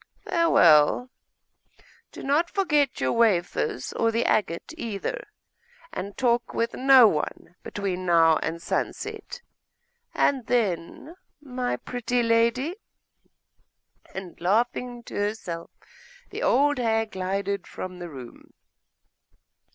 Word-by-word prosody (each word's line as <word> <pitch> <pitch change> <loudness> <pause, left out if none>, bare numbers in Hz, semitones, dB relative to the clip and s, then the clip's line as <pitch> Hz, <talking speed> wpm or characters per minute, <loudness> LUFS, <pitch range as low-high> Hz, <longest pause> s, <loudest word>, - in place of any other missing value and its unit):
Farewell. 245 - +4 1.0
Do - - -10
not 300 +5 +1
forget 300 -8 +1
your 130 - 0
wafers, 180 - 0
or 230 0 +1
the 230 +1 0
agate 185 - 0
either, 240 - -5 0.7
and 200 +2 -6
talk 240 -2 0
with 230 0 -1
no 260 -2 +7
one 155 -1 -3
between 185 -2 -4
now 165 -2 +5
and 165 +1 -3
sunset. 485 - -4 0.7
And 265 -4 +1
then 245 - -2 0.2
my 255 -3 -3
pretty 245 0 -2
lady!' 235 - +1 1.3
And 190 -3 -9
laughing 240 +5 0
to - - -12
herself, 205 -5 -3 0.6
the - - -5
old 285 +2 +3
hag 225 -2 0
glided 195 +1 -3
from 185 -1 -7
the 175 -1 -7
room. 130 -5 -12
230 Hz, 105 wpm, -25 LUFS, 185-255 Hz, 1.3 s, no